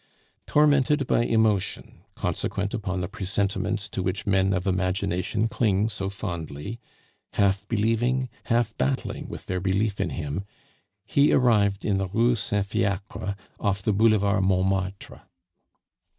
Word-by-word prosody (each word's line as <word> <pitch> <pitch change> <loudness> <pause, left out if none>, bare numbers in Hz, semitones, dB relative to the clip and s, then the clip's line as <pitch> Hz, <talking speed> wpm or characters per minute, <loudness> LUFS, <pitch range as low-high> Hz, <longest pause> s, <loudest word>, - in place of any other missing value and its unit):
Tormented 150 -1 +3
by - - +2
emotion, 110 -4 0
consequent 100 +2 -2
upon 95 -5 -2
the 90 - -2
presentiments 100 +1 -1
to - - -3
which 95 +2 -2
men 95 -1 +3
of 90 -1 -1
imagination 95 +2 0
cling 110 -3 +1
so 100 -2 -3
fondly, 85 0 -5 0.5
half 100 0 +1
believing, 120 +4 +1 0.2
half 115 -1 +1
battling 135 -1 -1
with - - -8
their 95 -1 -2
belief 100 +2 0
in - - 0
them, 75 +6 -4 0.6
he 140 +6 +3
arrived 105 -6 +3
in 100 -3 +1
the 95 - -1
Rue 115 +6 +2
Saint 105 -2 0
Fiacre 100 0 -2 0.2
off 100 -2 -1
the 105 - +2
Boulevard 100 -2 +3
Montmartre. 95 0 -1
100 Hz, 130 wpm, -25 LUFS, 95-110 Hz, 0.6 s, Tormented